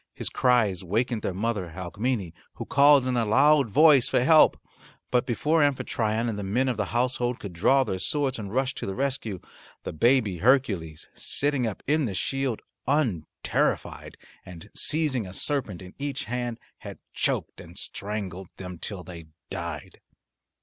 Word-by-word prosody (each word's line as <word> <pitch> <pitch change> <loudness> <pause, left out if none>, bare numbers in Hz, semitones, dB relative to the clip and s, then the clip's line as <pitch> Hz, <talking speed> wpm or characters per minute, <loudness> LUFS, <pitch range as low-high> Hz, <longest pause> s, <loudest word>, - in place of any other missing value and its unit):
His - - -3
cries 110 -8 +2
wakened 110 +5 -1
their - - -2
mother, 95 -3 -3
Alcmene, 95 +1 -3 0.2
who - - -6
called 140 -1 +5
in 130 -1 0
a 120 - +2
loud 140 +4 +4
voice 145 +1 +6
for 125 - +2
help. 155 +4 +6 0.5
But 125 0 +2
before 150 +6 +1
Amphitryon 115 -5 0
and 110 -3 -3
the - - -4
men 120 +7 0
of 125 - -1
the 105 - 0
household 120 +2 -1
could 100 -3 -7
draw 130 +11 +3
their 95 -7 -3
swords 135 +1 -1
and 100 -2 -6
rush 130 +2 0
to - - -6
the 95 - -3
rescue, 130 -8 -2 0.4
the - - -5
baby 110 - +2
Hercules, 100 - +1
sitting 140 -4 -1
up 105 - -6
in 150 +1 +2
the 100 -5 -3
shield 135 +1 -2 0.2
unterrified 125 - -1 0.3
and 90 +3 -12
seizing 145 -9 0
a 90 - -9
serpent 120 - -2
in 90 - -12
each 140 0 -3
hand, 120 0 -3 0.2
had - - -9 0.2
choked - - -1
and - - -13
strangled 100 -3 -5
them 90 -2 -8
till 100 -4 -6
they 85 -3 -10 0.2
died. 85 -3 -6
115 Hz, 165 wpm, -26 LUFS, 95-135 Hz, 0.5 s, voice